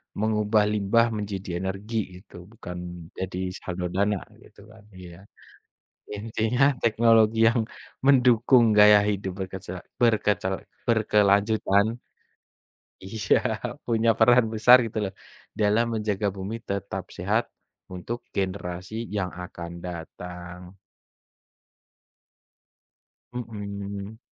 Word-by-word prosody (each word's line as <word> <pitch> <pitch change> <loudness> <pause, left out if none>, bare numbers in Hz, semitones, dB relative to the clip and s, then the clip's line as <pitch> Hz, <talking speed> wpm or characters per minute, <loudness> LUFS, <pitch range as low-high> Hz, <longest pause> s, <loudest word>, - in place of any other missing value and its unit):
mengubah 105 0 +2
limbah 105 +3 +2
menjadi 100 -4 -4
energi 95 -1 -4
gitu 90 -4 -13
bukan 90 -5 -9
jadi 95 0 -3
saldo 90 -1 -4
dana 100 +1 0 0.2
gitu - - -18
kan - - -17
iya. 90 +2 -12 0.9
Intinya 115 +6 +1
teknologi 115 0 +4
yang 115 -2 0 0.4
mendukung 125 -2 +5
gaya 105 0 +8
hidup 100 -2 -2
berkecela 95 -1 -6 0.2
berkecele 105 -5 +1 0.3
berkelanjutan. 105 -1 +2 1.1
Iya 105 +3 +1 0.5
punya 115 -1 +2
peran 120 -1 +5
besar 115 +3 +8
gitu 110 - -5
loh, 95 - -11 0.5
dalam 105 +2 +3
menjaga 105 -1 -1
bumi 100 +4 -4
tetap 100 -2 -4
sehat 105 +6 0 0.5
untuk 105 +7 -5 0.2
generasi 95 +1 -3 0.2
yang 95 -3 -1 0.2
akan 85 -1 -8
datang. 90 +1 -8 2.6
Mhm. 100 -3 -6
105 Hz, 95 wpm, -25 LUFS, 95-110 Hz, 2.6 s, gaya